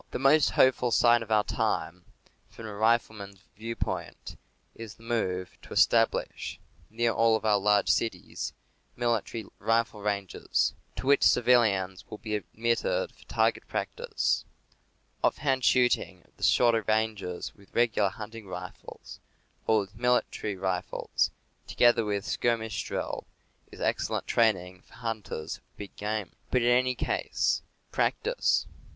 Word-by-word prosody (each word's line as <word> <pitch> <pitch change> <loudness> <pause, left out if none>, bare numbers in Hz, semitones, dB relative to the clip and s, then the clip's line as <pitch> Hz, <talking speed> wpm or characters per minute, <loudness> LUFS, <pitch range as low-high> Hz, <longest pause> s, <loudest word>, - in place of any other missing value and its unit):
The - - -3
most 140 +3 +5
hopeful 130 -1 +3
sign 120 +1 +5
of 115 - -7
our 105 -1 +4
time, 90 -3 -2 0.4
from 115 - -11
a 105 - -6
rifleman's 105 -3 0
viewpoint, 115 +2 -5 0.4
is 115 -2 -9
the 115 - -19
move 95 -6 -2
to - - -10
establish, - - +2 0.3
near 115 +1 +1
all 115 0 +3
of 110 - -3
our 105 -2 +4
large 105 0 +3
cities, 105 -6 -1 0.4
military 115 -2 -1
rifle 115 0 0
ranges, 100 -2 -1 0.2
to - - -6
which 140 +1 +4
civilians 105 -7 +3
will 105 - -7
be 110 -1 -6
admitted 115 - -1
for - - -20
target - - 0
practice. 475 -2 -1 0.8
Ofi'hand 135 -3 +1
shooting 120 -8 +2
at - - -30
the - - -11
shorter 115 -2 +4
ranges 110 -5 -1
with 100 -1 -21
regular 115 -4 +3
hunting 110 +2 -9
rifles, 90 -1 -9 0.5
or 110 -1 +4
with 95 -1 -10
military 120 -3 0
rifles, 95 -1 -1 0.4
together 120 -1 +4
with 105 -1 -2
skirmish 115 -3 -1
drill, - - -4 0.4
is - - -12
excellent - - -1
training 95 -5 +1
for - - -23
hunters 110 -9 -4
of - - -35
big 100 -1 -9
game. 105 -2 -3 0.2
But 125 -2 +2
in 120 - +3
any 130 0 +2
case, - - 0 0.3
practice! 485 +3 +1
110 Hz, 135 wpm, -28 LUFS, 100-120 Hz, 0.8 s, most